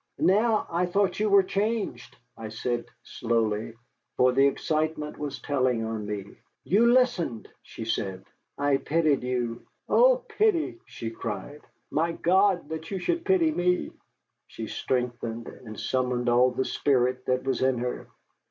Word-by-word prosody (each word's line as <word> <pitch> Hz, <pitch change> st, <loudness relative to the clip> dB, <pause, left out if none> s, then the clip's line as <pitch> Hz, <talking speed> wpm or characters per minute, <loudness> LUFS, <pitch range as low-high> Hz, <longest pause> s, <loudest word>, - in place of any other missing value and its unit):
"Now 215 Hz, +3 st, +3 dB
I 175 Hz, +2 st, +1 dB
thought 195 Hz, +1 st, +1 dB
you 215 Hz, 0 st, +2 dB
were 200 Hz, -1 st, +6 dB
changed," 200 Hz, -, -2 dB, 0.2 s
I 110 Hz, -1 st, -7 dB
said 120 Hz, +2 st, -2 dB, 0.2 s
slowly, 115 Hz, -1 st, -1 dB, 0.4 s
for 125 Hz, 0 st, +5 dB
the 135 Hz, +2 st, +4 dB
excitement 155 Hz, +1 st, -2 dB
was 145 Hz, -2 st, -4 dB
telling 130 Hz, -5 st, 0 dB
on 110 Hz, -2 st, -4 dB
me. 100 Hz, -1 st, -6 dB, 0.2 s
"You 230 Hz, +6 st, +4 dB
listened!" 240 Hz, -, +1 dB
she 110 Hz, -, -8 dB
said. 95 Hz, -4 st, -3 dB, 0.3 s
"I 145 Hz, -1 st, +2 dB
pitied 155 Hz, -1 st, +1 dB
you." 120 Hz, -2 st, -2 dB, 0.3 s
"Oh, -, -, +4 dB
pity!" 425 Hz, -7 st, +1 dB
she 115 Hz, -1 st, -6 dB
cried. 115 Hz, +6 st, -6 dB, 0.3 s
"My 165 Hz, +2 st, +1 dB
God, 185 Hz, -2 st, +2 dB
that 160 Hz, 0 st, -6 dB
you 195 Hz, -, -3 dB
should 340 Hz, -, -1 dB
pity 350 Hz, -5 st, +3 dB
me!" 180 Hz, -8 st, 0 dB, 0.6 s
She -, -, -7 dB
straightened, 120 Hz, -2 st, -3 dB
and 110 Hz, -3 st, -10 dB
summoned 125 Hz, -1 st, 0 dB
all 125 Hz, +1 st, +5 dB
the 130 Hz, +1 st, -2 dB
spirit 130 Hz, -2 st, +1 dB
that 130 Hz, 0 st, +1 dB
was 135 Hz, -2 st, -1 dB
in 130 Hz, -1 st, +2 dB
her. 125 Hz, +1 st, -4 dB
140 Hz, 145 wpm, -27 LUFS, 120-190 Hz, 0.6 s, were